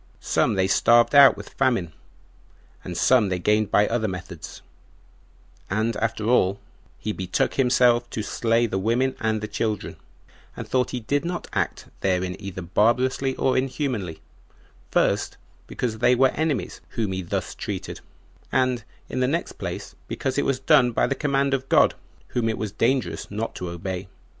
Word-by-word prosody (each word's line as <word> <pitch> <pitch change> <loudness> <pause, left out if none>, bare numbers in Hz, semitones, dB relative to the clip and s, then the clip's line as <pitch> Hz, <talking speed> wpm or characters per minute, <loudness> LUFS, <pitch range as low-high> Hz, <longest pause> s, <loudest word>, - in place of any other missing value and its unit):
Some - - +1
they 95 -1 +2
starved 120 +6 +4
out 140 -1 +8
with - - -9
famine, 120 -12 0 0.9
and 90 - -6
some 120 -6 +4
they 90 - 0
gained 105 +3 +1
by 105 0 +4
other 115 -2 0
methods; 90 -3 -8 1.1
and 110 +3 0
after 110 -1 -2
all, 100 -5 +3 0.4
he 110 - -3
betook 95 -3 -1
himself 125 -2 +3
to 110 - -4
slay 115 +2 +1
the 95 -4 -2
women 120 +6 +1
and 110 -1 0
the 110 - -3
children, 105 0 -3 0.6
and - - -6
thought 125 -1 +1
he 125 - -4
did 140 +6 0
not 175 0 -3
act - - -2
therein 90 -1 0
either 95 -2 -6
barbarously 125 +8 +1
or 130 - +1
inhumanly; 130 - -2 0.7
first, - - +1 0.3
because 110 -3 -3
they 120 +2 +4
were 130 +1 +4
enemies 145 - -2 0.2
whom 110 -4 0
he 95 0 -2
thus 85 - -3
treated, - - -5 0.5
and, 130 -3 +1 0.2
in - - -4
the 125 - +2
next 165 +6 -1
place, - - -5
because 130 - -3
it - - 0
was 135 -2 0
done 130 -3 +4
by - - +2
the - - 0
command 140 -1 0
of 135 0 -2
God, - - +5 0.4
whom 115 -2 0
it 110 - -2
was 105 -2 -3
dangerous 125 +5 0
not 110 +3 -3
to 90 - -5
obey. 90 +2 -5
115 Hz, 165 wpm, -24 LUFS, 100-130 Hz, 1.1 s, out